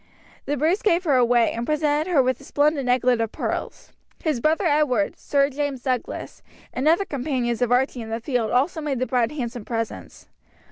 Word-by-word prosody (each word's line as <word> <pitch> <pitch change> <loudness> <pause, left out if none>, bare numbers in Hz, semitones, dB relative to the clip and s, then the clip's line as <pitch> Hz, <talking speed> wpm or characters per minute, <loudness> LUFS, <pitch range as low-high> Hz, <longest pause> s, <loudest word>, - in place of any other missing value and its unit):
The 290 +1 -1
Bruce 325 +8 +1
gave 360 -3 +2
her 295 -6 +2
away, 240 -2 +3
and 235 - -4
presented 300 +3 0
her 295 -7 +4
with 255 +2 -1
a - - -13
splendid 290 -1 +1
necklet 245 -1 +2
of 225 -1 -2
pearls. - - -5 0.3
His 305 -6 0
brother 315 +8 +1
Edward, 290 -9 +2
Sir 280 -1 +2
James 280 -2 -3
Douglas, 255 -3 -3 0.3
and 265 +4 -1
other 340 +5 +4
companions 250 - -2
of 245 -1 +1
Archie 250 0 +1
in 225 - -7
the 225 +1 -3
field 240 -2 -1
also 290 +6 +1
made 290 -3 -2
the 255 - 0
bride 245 -3 0
handsome 245 -5 -5
presents. 225 0 -5
265 Hz, 190 wpm, -23 LUFS, 245-300 Hz, 0.3 s, her